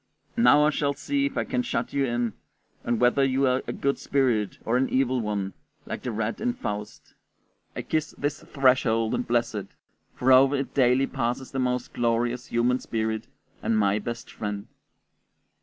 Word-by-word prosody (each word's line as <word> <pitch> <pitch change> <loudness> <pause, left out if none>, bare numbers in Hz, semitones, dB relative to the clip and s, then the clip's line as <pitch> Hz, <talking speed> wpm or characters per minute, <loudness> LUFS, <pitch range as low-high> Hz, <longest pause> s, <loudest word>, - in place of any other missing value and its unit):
"Now 150 -11 +6
I 150 - +4
shall 145 -1 0
see 280 - 0
if 280 - -7
I - - +2
can 250 - -1
shut 250 - -3
you 140 -1 +2
in, 120 -2 -1 0.5
and 120 -1 0
whether 125 +3 +4
you 135 +1 +2
are 130 0 +2
a - - -1
good 140 0 -1
spirit 125 -7 +1
or 115 - +1
an 130 +1 +2
evil 130 -1 +1
one, 100 -3 -2 0.3
like - - -5
the 125 - -3
rat 115 - -3
in 245 +2 +1
Faust; 105 - -6 0.6
I - - -4
kiss 155 -1 -2
this 145 +1 -2
threshold 125 -5 +2
and 125 - -1
bless 120 0 +1
it, 100 -2 -4 0.5
for 130 +1 +2
over 135 +2 +6
it 135 -1 -3
daily 130 0 +4
passes 125 +1 -3
the 135 - -3
most 125 -1 -1
glorious 120 +1 0
human 120 +2 +1
spirit 110 -1 -2 0.3
and 115 - +1
my 100 0 +2
best 120 +2 -6
friend." 105 -1 -4
125 Hz, 180 wpm, -26 LUFS, 115-135 Hz, 0.6 s, Now